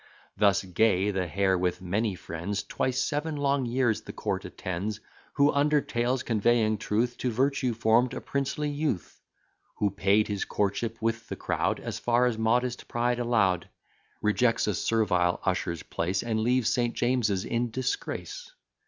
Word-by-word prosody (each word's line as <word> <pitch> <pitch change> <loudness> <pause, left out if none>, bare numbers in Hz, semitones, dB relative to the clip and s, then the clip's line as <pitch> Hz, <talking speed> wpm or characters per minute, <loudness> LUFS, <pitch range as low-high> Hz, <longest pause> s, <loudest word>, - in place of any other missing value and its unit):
Thus 100 -1 +3
Gay, 95 +1 +2
the 95 -2 -1
hare 95 +3 +2
with 90 0 0
many 100 +3 -1
friends, 90 +4 -4
Twice 130 0 -1
seven 150 +2 -1
long 140 -2 +1
years 120 -2 +1
the - - -8
court - - -3
attends: 100 +4 -4 0.3
Who, 145 0 +4
under 150 +1 +3
tales 125 -1 -1
conveying 110 -1 +2
truth, 115 +4 -1
To 125 - 0
virtue 130 0 0
form'd 115 +2 +3
a - - -3
princely 140 +2 -2
youth: 145 - -3 0.6
Who 100 -1 +1
paid 100 +2 +2
his 100 -1 -2
courtship 105 +3 -1
with 115 0 -1
the - - -3
crowd, - - -1
As - - -5
far 120 +1 +2
as 125 -2 +1
modest 120 +3 0
pride 120 +1 0
allow'd; 105 -7 +1 0.5
Rejects 115 +3 +2
a 105 - 0
servile 90 -6 +1
usher's 85 -3 -1
place, 90 +3 -2
And 115 -2 -1
leaves 120 +1 +2
St. 120 -1 0
James's 120 -6 +1
in 120 +1 -1
disgrace. 130 - -4
115 Hz, 155 wpm, -28 LUFS, 100-125 Hz, 0.6 s, Who